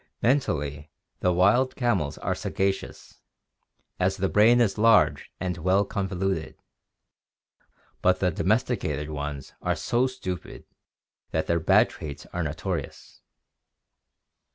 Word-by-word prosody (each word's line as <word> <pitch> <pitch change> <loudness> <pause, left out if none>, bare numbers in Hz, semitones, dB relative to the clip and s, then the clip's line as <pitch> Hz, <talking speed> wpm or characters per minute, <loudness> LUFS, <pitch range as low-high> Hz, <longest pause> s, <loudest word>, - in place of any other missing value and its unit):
— - - -52
Mentally 75 - 0 0.3
the 90 - +2
wild 100 +9 +3
camels 95 - 0
are - - -1
sagacious, 95 0 -3 0.8
as 95 +1 +1
the 95 0 0
brain 115 +4 +5
is 110 -3 +1
large 105 -11 +4
and 90 -1 -3
well 95 +4 +2
convoluted, 95 -4 -2 1.5
but 90 0 +3
the 90 -1 +2
domesticated 90 - -1
ones 70 -2 -5
are - - 0
so 120 +2 +1
stupid 95 -9 -7 0.6
that 80 - -1
their 85 0 +1
bad 80 - +4
traits 70 -3 -8
are 90 - -2
notorious. 80 -1 -5
95 Hz, 115 wpm, -26 LUFS, 80-105 Hz, 1.5 s, brain